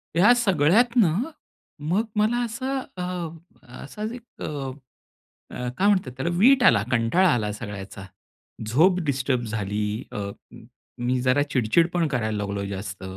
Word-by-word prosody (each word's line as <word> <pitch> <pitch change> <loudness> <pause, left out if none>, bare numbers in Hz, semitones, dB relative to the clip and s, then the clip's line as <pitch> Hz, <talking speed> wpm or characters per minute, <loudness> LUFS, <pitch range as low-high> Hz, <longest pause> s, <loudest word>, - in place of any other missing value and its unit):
या 200 +8 +6
सगळ्यातनं 205 - +3 0.7
मग 200 +6 +2
मला 215 +3 +2
असं, 260 +4 -3 0.2
अ, 175 -3 -7 0.2
असाच 210 +10 -5
एक 245 0 -12
अ, - - -3 1.3
काय 200 - +3
म्हणतात 185 -10 +2
त्याला, 135 +6 -1
विट 255 +5 +5
आला, 105 -4 +5
कंटाळा 125 +11 +3
आला 105 -3 -1
सगळ्याचा. 100 -2 -8 0.6
झोप 175 - +4
डिस्टर्ब 130 -2 0
झाली. 105 -2 -3 0.3
अ, - - -6 0.9
मी 125 +1 +1
जरा 130 +2 +3
चिडचिड 130 +8 +3
पण 170 -2 +1
करायला 110 -6 -1
लागलो 100 -1 -3
जास्त 95 -1 -6
155 Hz, 130 wpm, -24 LUFS, -, 1.3 s, या